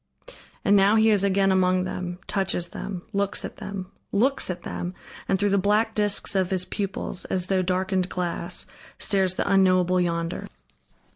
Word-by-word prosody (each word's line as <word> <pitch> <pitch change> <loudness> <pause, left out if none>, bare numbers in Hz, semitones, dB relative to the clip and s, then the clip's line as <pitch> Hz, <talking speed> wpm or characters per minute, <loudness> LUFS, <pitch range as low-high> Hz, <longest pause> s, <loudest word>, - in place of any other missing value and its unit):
And 200 - +5
now 200 +2 +5
he 220 0 +5
is 205 -2 +3
again 195 0 +3
among 185 -1 +3
them, 180 -1 -4
touches 190 -3 -1
them, 185 -1 -6
looks 200 0 0
at - - -8
them, 195 -2 -6 0.2
looks 255 +5 +2
at 180 -1 -4
them! 180 +1 -5 0.3
and 195 - +3
through 205 +1 +1
the 200 - +3
black 210 +3 +2
discs 205 -1 +1
of 190 -2 +1
his 185 -1 -1
pupils, 195 -2 -4
as 185 -1 -1
through 190 -1 +1
darkened 185 0 0
glass, 180 -2 -3 0.3
stares 190 -3 +1
the - - -1
unknowable 185 -2 +4
Yonder. 170 0 -2
190 Hz, 165 wpm, -25 LUFS, 180-200 Hz, 0.3 s, And